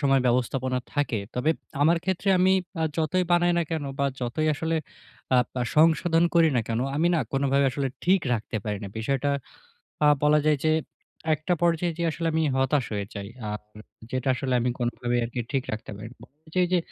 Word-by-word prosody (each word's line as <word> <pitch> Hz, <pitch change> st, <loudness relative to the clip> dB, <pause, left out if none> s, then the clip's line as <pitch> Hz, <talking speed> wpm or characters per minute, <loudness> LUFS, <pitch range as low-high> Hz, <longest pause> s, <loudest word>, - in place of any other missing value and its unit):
সময় 135 Hz, -2 st, +3 dB
ব্যবস্থাপনা 130 Hz, +1 st, +1 dB
থাকে। 145 Hz, -6 st, 0 dB, 0.2 s
তবে 125 Hz, +5 st, 0 dB
এপ -, -, -19 dB, 0.2 s
আমার 165 Hz, +3 st, +5 dB
ক্ষেত্রে 190 Hz, +1 st, -1 dB
আমি 185 Hz, +1 st, +4 dB, 0.3 s
আ -, -, +2 dB
যতই 165 Hz, +3 st, +1 dB
বানাই 175 Hz, 0 st, +4 dB
না 170 Hz, -, +2 dB
কেন 160 Hz, -3 st, -2 dB
বা, 140 Hz, -, +2 dB, 0.2 s
যতই 125 Hz, +6 st, -1 dB
আসলে 160 Hz, +2 st, -1 dB, 0.6 s
আপ 125 Hz, -1 st, +3 dB
আ -, -, +2 dB
সংশোধন 165 Hz, +1 st, +4 dB
করি 165 Hz, -1 st, +6 dB
না -, -, +3 dB
কেন, 115 Hz, +1 st, 0 dB, 0.2 s
আমি 165 Hz, +3 st, +2 dB
না 170 Hz, -, +3 dB
কোনভাবে 140 Hz, 0 st, +2 dB
আসলে 135 Hz, +1 st, -2 dB, 0.2 s
ঠিক 185 Hz, +1 st, +4 dB
রাখতে 110 Hz, -1 st, -2 dB
পারি 105 Hz, -2 st, -2 dB
না। 100 Hz, -, -5 dB
বিষয়টা 135 Hz, +5 st, 0 dB, 0.8 s
আ -, -, +6 dB, 0.2 s
বলা 150 Hz, +1 st, +5 dB
যায় 150 Hz, -, +3 dB
যে, 155 Hz, -, +4 dB, 0.6 s
একটা 155 Hz, +4 st, -1 dB
পর্যায়ে 170 Hz, 0 st, +2 dB
যেয়ে 170 Hz, -1 st, +1 dB
আসলে 165 Hz, +1 st, -3 dB
আমি 160 Hz, 0 st, +1 dB
হতাশ 135 Hz, 0 st, +2 dB
হয়ে 100 Hz, -1 st, -2 dB
যাই। 100 Hz, -1 st, -5 dB, 0.2 s
আপ 105 Hz, -, -4 dB, 0.2 s
এ -, -, -10 dB, 0.3 s
যেটা 130 Hz, 0 st, -2 dB
আসলে 130 Hz, -1 st, -1 dB
আমি 125 Hz, +1 st, +1 dB
কোনভাবেই 120 Hz, 0 st, -1 dB
আরকি 120 Hz, +2 st, -5 dB
আপনি 115 Hz, -, -16 dB
ঠিক 135 Hz, -2 st, 0 dB
রাখতে 110 Hz, 0 st, -5 dB
পারি 105 Hz, +2 st, -8 dB
না। -, -, -19 dB
বা -, -, -14 dB, 0.2 s
এইযে 160 Hz, +3 st, -4 dB
এইযে 180 Hz, -, -4 dB
যে -, -, +5 dB
140 Hz, 210 wpm, -26 LUFS, 125-165 Hz, 0.8 s, করি